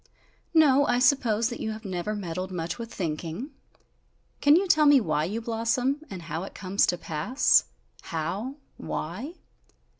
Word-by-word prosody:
"No, 285 Hz, -3 st, +5 dB
I 245 Hz, -, +2 dB
suppose 245 Hz, -3 st, +3 dB
that 240 Hz, -, -6 dB
you 220 Hz, -, -3 dB
have 220 Hz, +1 st, -10 dB
never 190 Hz, +2 st, -3 dB
meddled 185 Hz, -1 st, -4 dB
much 170 Hz, +2 st, -4 dB
with 230 Hz, -1 st, -6 dB
thinking! 170 Hz, -, -4 dB, 0.9 s
Can 290 Hz, +1 st, +6 dB
you 380 Hz, +3 st, +2 dB
tell 305 Hz, -4 st, +5 dB
me 290 Hz, -1 st, +7 dB
why 155 Hz, -8 st, 0 dB
you 215 Hz, +6 st, -3 dB
blossom? 235 Hz, +5 st, 0 dB
And 185 Hz, -3 st, -7 dB
how 160 Hz, 0 st, -4 dB
it 195 Hz, -, -8 dB
comes 195 Hz, +1 st, +1 dB
to 175 Hz, -, 0 dB
pass? 170 Hz, -, +2 dB, 0.4 s
How? 190 Hz, -, -3 dB, 0.2 s
Why?" 225 Hz, -, -5 dB
215 Hz, 155 wpm, -27 LUFS, 175-260 Hz, 0.9 s, me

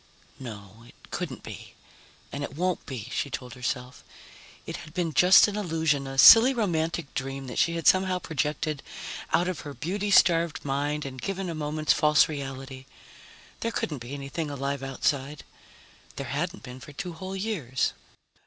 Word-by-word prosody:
No, 110 Hz, -3 st, -9 dB
it -, -, -18 dB, 0.2 s
couldn't -, -, -4 dB
be, -, -, -10 dB, 0.6 s
and 140 Hz, +1 st, -4 dB
it 140 Hz, -, -6 dB
won't 180 Hz, +1 st, -1 dB
be, 125 Hz, -6 st, -6 dB
she 140 Hz, -, -2 dB
told 125 Hz, -2 st, -6 dB
herself. 125 Hz, -1 st, -4 dB, 0.6 s
It -, -, -5 dB
had 155 Hz, -, -12 dB
been 170 Hz, -3 st, -1 dB
just 180 Hz, +9 st, +7 dB
an 205 Hz, -, -4 dB
illusion, 160 Hz, -8 st, 0 dB
a 135 Hz, 0 st, -6 dB
silly 230 Hz, -, +9 dB
romantic 165 Hz, -, -1 dB
dream 135 Hz, 0 st, -4 dB
that 125 Hz, -, -4 dB
she 170 Hz, -, +2 dB
had 165 Hz, -, -4 dB
somehow 185 Hz, -1 st, +4 dB
projected 150 Hz, -2 st, -2 dB, 0.5 s
out 170 Hz, +2 st, +3 dB
of 185 Hz, -3 st, -3 dB
her 145 Hz, -2 st, -8 dB
beauty 200 Hz, +6 st, -2 dB
starved 170 Hz, -5 st, +4 dB
mind 145 Hz, +2 st, -1 dB
and 130 Hz, -1 st, -7 dB
given 195 Hz, -2 st, -3 dB
a -, -, -4 dB
moment's 155 Hz, 0 st, 0 dB
false 150 Hz, -1 st, +4 dB
reality. 135 Hz, -2 st, -7 dB, 0.7 s
There 230 Hz, -, -1 dB
couldn't 150 Hz, -, -3 dB
be 120 Hz, +4 st, -7 dB
anything 140 Hz, +3 st, -4 dB
alive 140 Hz, -1 st, -3 dB
outside. 135 Hz, +2 st, -2 dB, 0.7 s
There 140 Hz, -, -5 dB
hadn't 170 Hz, +8 st, -3 dB
been 125 Hz, 0 st, -9 dB
for 145 Hz, +3 st, -12 dB
two 175 Hz, +4 st, -5 dB
whole 185 Hz, +3 st, -6 dB
years. 185 Hz, -, -1 dB
150 Hz, 165 wpm, -27 LUFS, 135-175 Hz, 0.7 s, silly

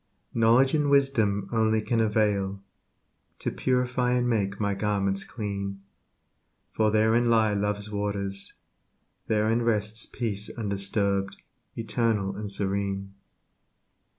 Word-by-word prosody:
Knowledge 120 Hz, +4 st, +4 dB
and 150 Hz, -2 st, +2 dB
wisdom 115 Hz, -8 st, +2 dB
only 110 Hz, -1 st, +2 dB
can 115 Hz, +2 st, 0 dB
avail 105 Hz, -3 st, +1 dB, 0.8 s
To -, -, -3 dB
purify 125 Hz, -1 st, 0 dB
and 125 Hz, 0 st, +1 dB
make 100 Hz, -4 st, 0 dB
my 100 Hz, -1 st, 0 dB
garment 100 Hz, -1 st, -1 dB
clean, 100 Hz, -3 st, -5 dB, 0.9 s
For 110 Hz, -1 st, +2 dB
therein 110 Hz, +3 st, +3 dB
lie 110 Hz, -2 st, +3 dB
love's 105 Hz, +1 st, -2 dB
waters; 100 Hz, -1 st, -3 dB, 0.7 s
therein 110 Hz, +2 st, +2 dB
rests 110 Hz, -1 st, +1 dB
Peace 105 Hz, -4 st, -3 dB
undisturbed, 100 Hz, -2 st, 0 dB, 0.4 s
eternal, 110 Hz, -4 st, 0 dB
and 105 Hz, 0 st, -3 dB
serene. 100 Hz, 0 st, -2 dB
105 Hz, 105 wpm, -27 LUFS, 100-115 Hz, 0.9 s, Knowledge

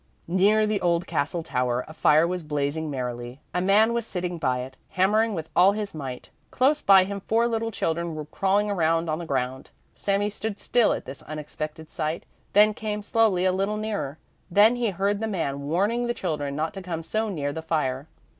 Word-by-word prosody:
Near 200 Hz, +5 st, +4 dB
the 210 Hz, -2 st, 0 dB
old 170 Hz, 0 st, +1 dB
castle 165 Hz, +3 st, -1 dB
tower 125 Hz, -4 st, -1 dB
a 155 Hz, -, -10 dB
fire 155 Hz, 0 st, +4 dB
was 180 Hz, +1 st, -2 dB
blazing 150 Hz, +1 st, -2 dB
merrily; 125 Hz, -1 st, -5 dB
a 180 Hz, -, 0 dB
man 210 Hz, +5 st, +4 dB
was 235 Hz, 0 st, 0 dB
sitting 180 Hz, -5 st, -4 dB
by 130 Hz, -4 st, 0 dB
it, 130 Hz, +1 st, -8 dB
hammering 210 Hz, +4 st, +2 dB
with 160 Hz, -2 st, -6 dB
all 190 Hz, +3 st, +6 dB
his 210 Hz, -1 st, -4 dB
might. 135 Hz, -5 st, -7 dB, 0.2 s
Close 285 Hz, +4 st, +2 dB
by 195 Hz, -1 st, +7 dB
him 200 Hz, +1 st, -4 dB
four 225 Hz, +4 st, +1 dB
little 225 Hz, -1 st, -1 dB
children 170 Hz, -5 st, -2 dB
were 155 Hz, -1 st, -5 dB
crawling 195 Hz, +6 st, +1 dB
around 165 Hz, -3 st, +1 dB
on 155 Hz, -, -1 dB
the 170 Hz, -, -6 dB
ground. 130 Hz, -1 st, -2 dB, 0.2 s
Sami 200 Hz, +1 st, 0 dB
stood 210 Hz, 0 st, -4 dB
still 240 Hz, -2 st, +3 dB
at -, -, -3 dB
this 135 Hz, +2 st, -8 dB
unexpected 155 Hz, +1 st, -7 dB
sight, 155 Hz, -1 st, -2 dB, 0.3 s
then 210 Hz, +1 st, +6 dB
came 210 Hz, -1 st, -4 dB
slowly 205 Hz, -4 st, +2 dB
a 185 Hz, -, +4 dB
little 195 Hz, +3 st, -1 dB
nearer. 210 Hz, -9 st, -3 dB, 0.3 s
Then 210 Hz, +6 st, +5 dB
he 240 Hz, -2 st, 0 dB
heard 200 Hz, +2 st, 0 dB
the 220 Hz, -, -2 dB
man 140 Hz, -8 st, -3 dB
warning 210 Hz, +9 st, +1 dB
the 240 Hz, -, -1 dB
children 150 Hz, -8 st, -3 dB
not 155 Hz, +2 st, -2 dB
to 195 Hz, -, -7 dB
come 170 Hz, -3 st, -4 dB
so 220 Hz, +6 st, -1 dB
near 145 Hz, -7 st, -2 dB
the 160 Hz, -, -4 dB
fire. 150 Hz, -4 st, -1 dB
180 Hz, 200 wpm, -25 LUFS, 155-210 Hz, 0.3 s, by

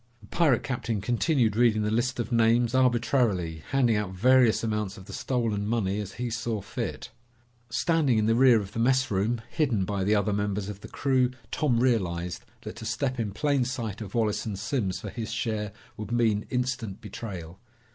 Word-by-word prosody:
The -, -, -14 dB
pirate 150 Hz, -8 st, +2 dB
captain 120 Hz, -6 st, -2 dB
continued 120 Hz, -, +1 dB
reading 110 Hz, -2 st, +3 dB
the 105 Hz, -, 0 dB
list 120 Hz, +3 st, 0 dB
of 120 Hz, +1 st, -3 dB
names, 115 Hz, +1 st, +3 dB
arbitrarily, 120 Hz, -, +2 dB
handing 125 Hz, -5 st, +3 dB
out 105 Hz, -3 st, -3 dB
various 125 Hz, +3 st, +4 dB
amounts 105 Hz, -3 st, -2 dB
of 95 Hz, -, -11 dB
the -, -, -10 dB
stolen 115 Hz, -5 st, -1 dB
money 105 Hz, -3 st, 0 dB
as 100 Hz, -2 st, -5 dB
he 120 Hz, 0 st, -4 dB
saw 115 Hz, -1 st, -2 dB
fit. 110 Hz, +4 st, -5 dB, 0.6 s
Standing 150 Hz, -3 st, +2 dB
in 110 Hz, -, +2 dB
the 115 Hz, -, +3 dB
rear 125 Hz, -1 st, +6 dB
of 100 Hz, -2 st, -6 dB
the 115 Hz, -, -5 dB
messroom, 120 Hz, -3 st, +1 dB
hidden 120 Hz, -11 st, +1 dB
by 100 Hz, 0 st, -2 dB
the 105 Hz, +3 st, +3 dB
other 105 Hz, 0 st, +1 dB
members 105 Hz, 0 st, -1 dB
of 100 Hz, -1 st, -7 dB
the -, -, -9 dB
crew, 130 Hz, -2 st, +1 dB, 0.2 s
Tom 130 Hz, -6 st, +1 dB
realized 90 Hz, -8 st, 0 dB, 0.2 s
that -, -, -7 dB
to 115 Hz, -, -7 dB
step 125 Hz, +3 st, -1 dB
in 110 Hz, -3 st, -1 dB
plain 140 Hz, +4 st, +1 dB
sight 115 Hz, -4 st, -4 dB
of 100 Hz, -1 st, -7 dB
Wallace 110 Hz, -3 st, +1 dB
and 105 Hz, -3 st, -4 dB
Simms 105 Hz, -3 st, -2 dB
for -, -, -7 dB
his 115 Hz, -3 st, -5 dB
share 110 Hz, -2 st, -2 dB, 0.3 s
would 105 Hz, 0 st, -6 dB
mean 110 Hz, -3 st, +1 dB
instant 125 Hz, -5 st, -2 dB
betrayal. 95 Hz, -5 st, -8 dB
115 Hz, 185 wpm, -27 LUFS, 105-125 Hz, 0.6 s, rear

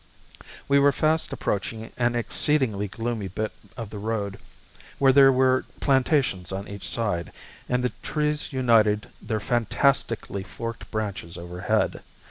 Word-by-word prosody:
We 140 Hz, 0 st, +5 dB
were 140 Hz, 0 st, +5 dB
fast 155 Hz, +3 st, +1 dB
approaching 110 Hz, +3 st, -3 dB
an 120 Hz, 0 st, +1 dB
exceedingly 120 Hz, -3 st, +1 dB
gloomy 115 Hz, 0 st, -3 dB
bit 110 Hz, +4 st, -3 dB, 0.3 s
of 115 Hz, -3 st, -6 dB
the 105 Hz, -, -6 dB
road 105 Hz, -2 st, -3 dB, 0.6 s
where 135 Hz, -1 st, +5 dB
there 135 Hz, 0 st, +8 dB
were 130 Hz, 0 st, +3 dB, 0.2 s
plantations 130 Hz, -, +2 dB
on 95 Hz, +1 st, -4 dB
each 100 Hz, -1 st, -5 dB
side, 100 Hz, -8 st, -1 dB, 0.4 s
and 125 Hz, 0 st, +1 dB
the 125 Hz, -, 0 dB
trees 150 Hz, 0 st, -1 dB
united 115 Hz, -5 st, +3 dB
their 110 Hz, -, -2 dB
fantastically 115 Hz, -1 st, 0 dB
forked 115 Hz, +4 st, -7 dB
branches 100 Hz, -6 st, -4 dB
overhead. 90 Hz, +1 st, -1 dB
115 Hz, 130 wpm, -25 LUFS, 100-130 Hz, 0.6 s, there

